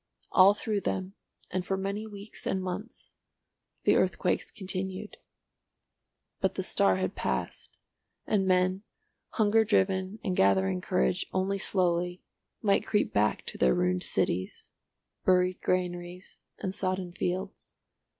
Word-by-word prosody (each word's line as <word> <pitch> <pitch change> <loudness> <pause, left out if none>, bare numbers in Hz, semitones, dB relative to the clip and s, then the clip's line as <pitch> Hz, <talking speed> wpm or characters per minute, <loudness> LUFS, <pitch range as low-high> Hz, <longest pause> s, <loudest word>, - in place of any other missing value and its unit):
All 195 +2 +7
through 210 -1 -2
them, 190 0 -2 0.4
and 185 0 -1
for 190 +2 -1
many 200 +3 -3
weeks 205 0 -9
and 190 - 0
months, 185 +5 -6 0.7
the - - +4
earthquakes - - +1
continued. 190 -2 -5 1.2
But - - 0
the - - -2
star 95 -1 +3
had 95 0 -1
passed, 65 - -3 0.5
and 195 -3 +1
men, 185 +1 +2 0.5
hunger 220 0 +4
driven 190 -2 +1
and 185 -3 -1
gathering 95 - +3
courage 65 -6 0
only 195 +1 0
slowly, 180 -2 +1 0.4
might 200 -2 +3
creep 210 - 0
back 105 +1 +1
to - - -7
their 65 -1 +4
ruined 90 0 +1
cities, 95 +2 -1 0.5
buried 180 0 +3
granaries, 180 0 -3 0.2
and 190 -2 -4
sodden 185 -2 -2
fields. 185 +2 -4
185 Hz, 125 wpm, -29 LUFS, 175-195 Hz, 1.2 s, All